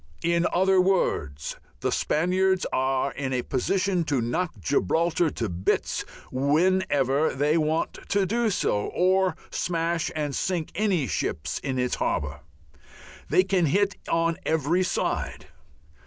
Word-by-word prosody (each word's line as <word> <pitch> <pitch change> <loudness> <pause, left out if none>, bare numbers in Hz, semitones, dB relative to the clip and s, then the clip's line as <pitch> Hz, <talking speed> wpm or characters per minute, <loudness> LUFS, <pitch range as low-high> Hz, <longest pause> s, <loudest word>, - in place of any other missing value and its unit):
In 170 +1 +2
other 190 +1 +4
words, 75 - 0 0.2
the - - 0
Spaniards 185 +3 +1
are 130 +1 +1
in 130 -1 -3
a 125 -1 0
position 185 +6 0
to 140 -4 0
knock 125 +10 -1
Gibraltar 160 - +1
to 115 -5 -3
bits 90 +1 -1 0.3
whenever 145 -1 +2
they 145 +3 +2
want 160 0 0
to 200 -1 +2
do 230 +3 +1
so, 105 - 0
or 185 +1 +3
to - - -28 0.2
smash 170 0 0
and 150 -2 -2
sink 175 +1 -2
any 190 -7 +1
ships 80 - -2
in 130 -2 -3
its 125 -1 0
harbour. - - -1 0.9
They 185 - +5
can 190 -3 +1
hit 195 +5 +2
it - - -16
on 165 0 +1
every 160 +3 +1
side. 185 - -2
165 Hz, 140 wpm, -26 LUFS, 135-185 Hz, 0.9 s, They